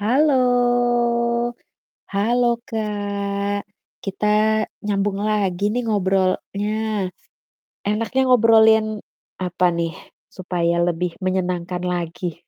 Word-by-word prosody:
Halo! 270 +9 +3 1.8
Halo 235 +5 +1 0.2
Kak, 205 -3 -2 0.4
kita 210 +2 +1 0.2
nyambung 200 -1 -1
lagi 205 -2 0
nih 240 +3 -1
ngobrolnya. 200 0 0 1.1
Enaknya 220 +5 0
ngobrolin 220 -2 +5 0.4
apa 180 0 0
nih 170 -1 -2 0.4
supaya 175 -2 -1
lebih 175 0 -2
menyenangkan 180 -1 -1
lagi. 175 -1 -3
200 Hz, 75 wpm, -21 LUFS, 180-215 Hz, 1.8 s, ngobrolin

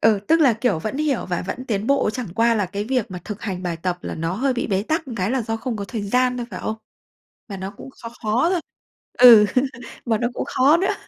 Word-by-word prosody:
ừ, 220 -3 +4
tức 325 +1 +4
là, 275 -6 +6
kiểu, 225 -5 0
vẫn 215 +10 -4
hiểu 295 -4 -1
và 175 -2 -2
vẫn 255 - -5
tiến 210 -3 -2
bộ, 275 -5 +2
chẳng 245 0 -5
qua 230 +1 +3
là 205 -4 0
cái 200 +3 -4
việc 245 -2 -1
mà 180 - -5
thực 210 0 -7
hành 185 -4 -4
bài 175 -2 -2
tập 180 +2 -3
là - - -5
nó 165 +2 -2
hơi 260 +6 +1
bị 245 - -2
bế 195 -2 0
tắc 315 +5 -2
một 240 - -5
cái 190 0 -1
là 260 -1 0
do 225 +1 -3
không 235 0 -4
có 200 - -4
thời 215 +2 -4
gian 250 +5 +1
thôi, 240 -1 -4
phải - - -6
không? 220 - -3 0.7
Mà 200 -3 -6
nó 190 +1 -5
cũng - - -10
khó 230 - -6
khó 225 +9 +2
thôi, 360 -2 0 0.6
ừ, 235 -4 +9 0.6
mà 225 -3 +1
nó 240 +2 0
cũng - - -3
khó 280 +5 +4
nữa, 380 +3 +1
225 Hz, 265 wpm, -22 LUFS, 200-255 Hz, 0.7 s, ừ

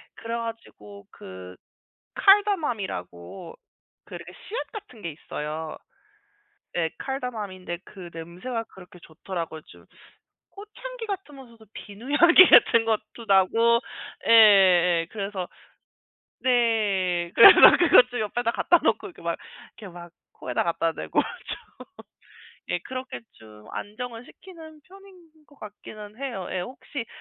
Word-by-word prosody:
그래 230 0 -6
가지고 165 - -9
그 90 -1 -11 0.6
카다멈이라고 210 - 0 0.5
그 - - -9
씨앗 455 +5 -8
같은 405 - -11
게 170 - -5
있어요. 155 +1 -7 1.0
예 165 -2 0
카다멈인데 215 -10 -5
그 180 -3 -12
냄새가 180 +9 -6
그렇게 180 -1 -15
좋더라고요 165 -1 -7
좀. - - -17 0.7
꽃향기 460 +4 -10
같은면서도 270 - -9
비누 205 +3 -11
향기 350 +2 +8
같은 230 -1 +6
것도 225 +1 -3
나고 225 +5 +3 0.5
예예. 185 -6 +5
그래서 200 -3 -5 0.9
네. 205 -8 +1
그래서 230 - +9 0.2
그거 345 -7 +7
좀 245 - -5
옆에다 230 +2 -1
갖다 345 +7 +3
놓고 - - 0
이렇게 - - -16
막 - - -2 0.4
이렇게 200 -5 -11
막 175 0 -11 0.2
코에다 - - -3
갖다 165 -1 -1
대고 80 - -1
좀 - - -7 1.1
예 175 - 0
그렇게 255 +6 -7
좀 105 -1 -17
안정을 235 +3 -7
시키는 320 -5 -15
편인 390 +1 -17 0.3
것 285 - -23
같기는 210 +1 -12
해요. 245 -10 -5
예 185 - -2
혹시 250 +4 -7
215 Hz, 255 characters per minute, -24 LUFS, 175-255 Hz, 1.1 s, 그래서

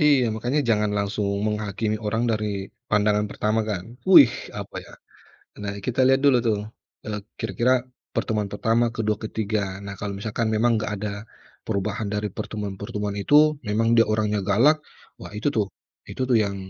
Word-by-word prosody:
iya, 145 -4 +5
makanya 120 +7 0
jangan 105 -2 +2
langsung 100 0 -1 0.2
menghakimi 105 0 -1
orang 115 +1 -1
dari 110 -1 0 0.4
pandangan 105 0 +2
pertama, 110 +1 0
kan. 90 -3 -3 0.2
Wih 140 -10 +9 0.2
apa, - - -7
ya, - - -15 0.7
nah 100 -1 -3
kita 125 +1 -2
lihat 135 0 +4
dulu, 135 -3 +6
tuh, 105 -2 +2 0.5
eee, 105 -1 -3 0.2
kira-kira 120 +3 +1 0.4
pertemuan 105 -3 -1
pertama, 115 +3 +2
kedua, 110 -2 0
ketiga. 105 -3 -2
Nah 100 - -5
kalau 100 -1 -3
misalkan 110 +2 -2
memang 120 +3 +3
nggak 110 - -3
ada 105 0 -3 0.5
perubahan 105 +1 -2
dari 105 +1 -2
pertemuan-pertemuan 105 0 -4
itu 150 +7 +4
memang 110 +2 +1
dia 115 - +6
orangnya 105 -1 +1
galak, 115 +11 +4 0.4
wah - - -8
itu, 105 - -1
tuh, 105 -3 +1 0.4
itu, - - -5
tuh, 120 - +5
yang 100 -1 -3
105 Hz, 160 wpm, -24 LUFS, 105-115 Hz, 0.7 s, Wih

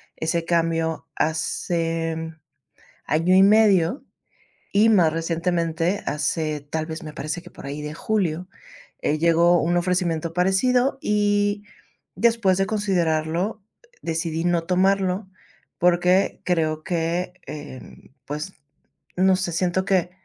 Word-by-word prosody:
ese 165 +1 -1
cambio 165 -1 0
hace, 165 +1 -1
mm, 160 0 -6 0.7
año 165 +5 +3
y 190 - +7
medio, 205 - +4 0.7
y 215 +3 +4
más 175 -8 +4
recientemente 165 +2 -1
hace, 150 0 -1
tal 155 +2 -4
vez, 160 +2 -6
me 155 -1 -8
parece 155 +4 -5
que, 175 - -13
por - - -12
ahí 145 +2 -5
de 150 0 -5
julio, 180 -3 -1 0.6
eh, 150 +1 +1
llegó 170 +1 +4
un 175 +2 +1
ofrecimiento 175 -2 0
parecido, 245 +9 +2
y, 205 0 +1 0.5
después 230 -5 +2
de 195 - +2
considerarlo, 185 -1 -1 0.4
decidí 165 0 -2
no 175 -1 +1
tomarlo 190 +2 +1 0.5
porque 180 +2 +2
creo 155 -3 0
que, 175 +1 -2
em, 145 -3 -10
pues, 150 +6 -5 0.6
no 185 +1 +4
sé, 185 -2 -2
siento 180 +2 0
que, 185 -2 +1
175 Hz, 120 wpm, -23 LUFS, 160-190 Hz, 0.7 s, y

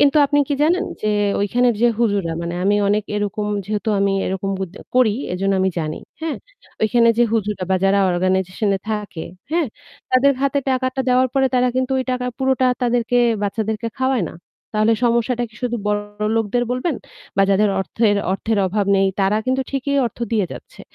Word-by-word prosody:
কিন্তু 285 +1 +4
আপনি 290 +1 +1
কি 285 - +1
জানেন 360 +5 +2 0.2
যে, - - -1 0.3
ওইখানের 240 +4 +2
যে - - +6
হুজুররা, 200 -7 +1
মানে 170 +1 -3
আমি 205 +1 +3
অনেক 210 0 +1
এরকম 205 0 -2 0.2
যেহেতু 210 +2 -3
আমি 200 0 +2
এরকম 190 +1 -2
বুদ 190 -3 -4 0.2
করি, 250 -5 +4 0.2
এজন্য 195 +2 0
আমি 190 0 +2
জানি, 155 -1 -3 0.2
হ্যাঁ? 320 -2 -2 0.5
ওইখানে 230 +1 +4
যে - - +6
হুজুররা 210 -4 -1
বা 190 - +4
যারা 195 +1 +4
organization 185 +3 0
এ - - -7
থাকে, 210 -6 -4 0.3
হ্যাঁ? 335 -3 +2 0.4
তাদের 255 +2 +5
হাতে 275 0 +2
টাকাটা 260 0 0
দেওয়ার 255 +1 +3
পরে 265 -1 +3
তারা 250 0 +3
কিন্তু 260 +1 0
ওই 260 - -1
টাকা 250 0 -1
পুরোটা 265 -1 +2 0.2
তাদেরকে 245 0 +1 0.3
বাচ্চাদেরকে 220 +2 -2
খাওয়ায় 260 -7 +1
না। - - -13 0.4
তাহলে 215 +2 +3
সমস্যাটা 235 +1 +1
কি 220 - -22
শুধু 240 -1 -1
বড়লোকদের 210 +2 -1
বলবেন? 255 +6 -1 0.4
বা 195 - +5
যাদের 205 +2 +3
অর্থের, 205 +2 +1 0.2
অর্থের 220 +2 -1
অভাব 200 +2 -1
নেই, 195 0 +3
তারা 195 +2 +2
কিন্তু 260 +1 +1
ঠিকই 280 +1 -1
অর্থ 230 - -9
দিয়ে 205 -5 +2
যাচ্ছে। - - -12
220 Hz, 180 wpm, -20 LUFS, 200-255 Hz, 0.5 s, যে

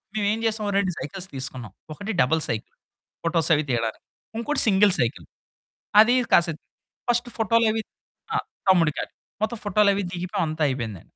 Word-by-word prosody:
మేమేం 210 +1 0
చేసాం. 220 -1 0
ఓ - - 0
2 190 -2 +1
సైకిల్స్ 190 +6 -4
తీసుకున్నాం. 130 -5 -4 0.2
ఒకటి 200 +7 -5
డబుల్ 160 +5 +2
సైకిల్. 110 -1 -4 0.5
ఫోటోస్ 170 -1 +1
అవి 150 - 0
తీయడానికి. 115 -2 -2 0.3
ఇంకోటి 280 +5 +1
సింగిల్ 200 -1 +5
సైకిలు, 110 - -1 0.7
అది 240 +3 +4 0.2
కాసేపు 165 -1 +3 0.5
ఫస్ట్ 240 0 +1
ఫోటోలవి 225 0 +2 0.5
ఆహ్, - - -1 0.2
తమ్ముడికాట్ 165 -5 +2 0.3
మొత్తం 225 0 -2
ఫోటోలవి 200 0 +3
దిగిపోయాం. 180 -1 -2
అంతా 155 0 -2
అయిపోయింది. 115 -9 -4
185 Hz, 140 wpm, -24 LUFS, 145-215 Hz, 0.7 s, సింగిల్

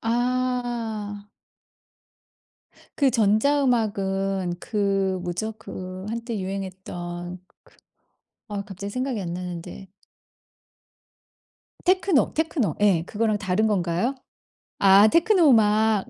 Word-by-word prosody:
아. 235 -4 -2 1.7
그 275 -3 +4
전자음악은 205 -6 +1
그 195 -3 0
뭐죠? 180 +5 -3
그 185 +1 -8
한때 230 -1 -4
유행했던 180 -2 -6
그 - - -36 0.9
아 205 -1 -3
갑자기 200 0 -7
생각이 255 -4 -2
안 170 -2 -4
나는데 180 +1 -7 2.0
테크노, 370 -4 +3
테크노 300 - 0
예 190 -6 +4
그거랑 215 +1 0
다른 200 +2 +1
건가요? 185 +4 0 0.6
아 195 +2 +7
테크노 340 - +4
음악. 215 -2 +3
205 Hz, 185 characters per minute, -24 LUFS, 190-240 Hz, 2.0 s, 아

